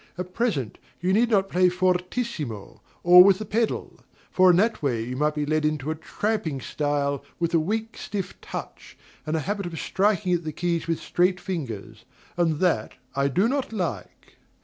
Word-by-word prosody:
At 180 0 -6
present, 195 - -1 0.2
you 185 +2 +1
need 230 +3 +3
not 195 -4 +3
play 185 -1 +3
fortissimo, 180 - -2 0.2
or 180 +1 +10
with 195 -1 +5
the 215 - -6
pedal: 225 +3 -2 0.3
for 185 0 +5
in 175 - +6
that 225 +4 +2
way 120 -6 0
you 125 +2 -5
might 150 +2 +1
be 150 -1 -1
led 155 +1 0
into 150 -1 -1
a - - -2
tramping 165 -2 -2
style, 140 0 -1 0.2
with 170 0 -1
a 165 - +5
weak, 220 +7 -2
stiff 195 -3 -4
touch, - - -8 0.3
and 155 - 0
a 160 - 0
habit 200 +2 -3
of 165 -2 -6
striking 195 -2 +1
at 175 -1 0
the 155 - -4
keys 170 0 -1
with 165 -2 0
straight 180 +1 +1
fingers; 150 - -6 0.3
and 165 -3 +1
that 170 -13 +1 0.2
I 140 0 +2
do 185 - +2
not 270 0 -1
like. 185 -6 -5
175 Hz, 185 wpm, -25 LUFS, 150-195 Hz, 0.3 s, or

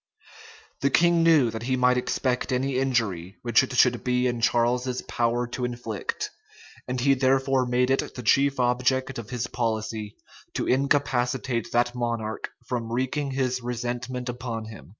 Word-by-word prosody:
The 140 - +2
king 170 +3 +4
knew 155 -8 +5
that 110 0 -5
he 130 +2 0
might 125 0 +3
expect 125 +1 -1
any 130 +1 0
injury 110 -9 -1
which 120 -1 +4
it 130 - -4
should 125 -1 +4
be 125 0 +1
in 120 -2 -1
Charles's 125 +2 +1
power 120 +1 0
to 125 - -4
inflict; 120 -3 -4 0.6
and 125 0 -2
he 135 +3 +4
therefore 135 0 +2
made 125 +1 +2
it 135 - 0
the 125 - -6
chief 140 +4 +3
object 125 +1 +1
of 110 - -8
his 125 -2 -2
policy 110 -3 -3 0.4
to - - -1
incapacitate 130 -3 0
that 120 0 +2
monarch 115 -3 -3 0.2
from 115 -2 -3
wreaking 130 +4 -1
his 130 -1 0
resentment 125 +1 -4
upon 120 -2 -4
him. 110 - -11
125 Hz, 155 wpm, -26 LUFS, 120-130 Hz, 0.6 s, knew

